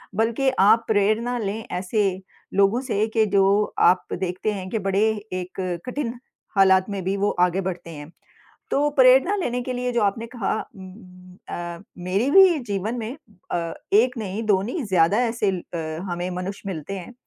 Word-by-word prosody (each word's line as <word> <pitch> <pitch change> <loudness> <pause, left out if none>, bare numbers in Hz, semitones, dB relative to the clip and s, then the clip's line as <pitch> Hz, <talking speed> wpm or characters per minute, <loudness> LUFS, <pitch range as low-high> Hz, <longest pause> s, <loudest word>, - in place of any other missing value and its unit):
बल्कि 230 +5 +1 0.2
आप 230 +2 +5
प्रेरणा 220 +4 +1
लें 210 0 -3
ऐसे 195 +3 0 0.4
लोगों 200 +6 +3
से 210 +2 +2
कि 220 - +5
जो 200 +2 +3 0.2
आप 185 0 -2
देखते 185 +3 -2
हैं 185 -2 -6
कि 220 - -1
बड़े 195 +2 +1 0.4
एक 185 +1 -7 0.2
कठिन 250 -2 -3 0.4
हालात 190 0 +5
में 195 -2 -4
भी 190 +2 -1
वो 205 +1 +1 0.2
आगे 185 +2 -2
बढ़ते 175 -1 -10
हैं। 150 0 -9 0.6
तो 295 +1 +2
प्रेरणा 265 +7 +5
लेने 245 -9 -2
के 255 +1 -4
लिए 250 0 -2
जो 235 - +1
आपने 205 +3 0
कहा 230 -5 -2 0.2
उम 190 -1 -10
उम, 185 -1 -15
अ, 175 -1 -5 0.2
मेरे 190 +8 0
भी 375 -4 +7
जीवन 205 +4 -2
में 230 +6 -5 0.3
अ, 170 -1 -2 0.2
एक 245 +4 +4
नहीं, 205 0 -4
दो 200 -3 +2
नहीं 250 - -3
ज़्यादा 185 +1 +3
ऐसे 225 -4 0
ल 180 -2 -4
अ, 160 0 -4
हमें 175 +1 -3
मनुष्य 195 +2 -5
मिलते 175 +1 -5
हैं 210 +8 -10
200 Hz, 175 wpm, -23 LUFS, 185-235 Hz, 0.6 s, भी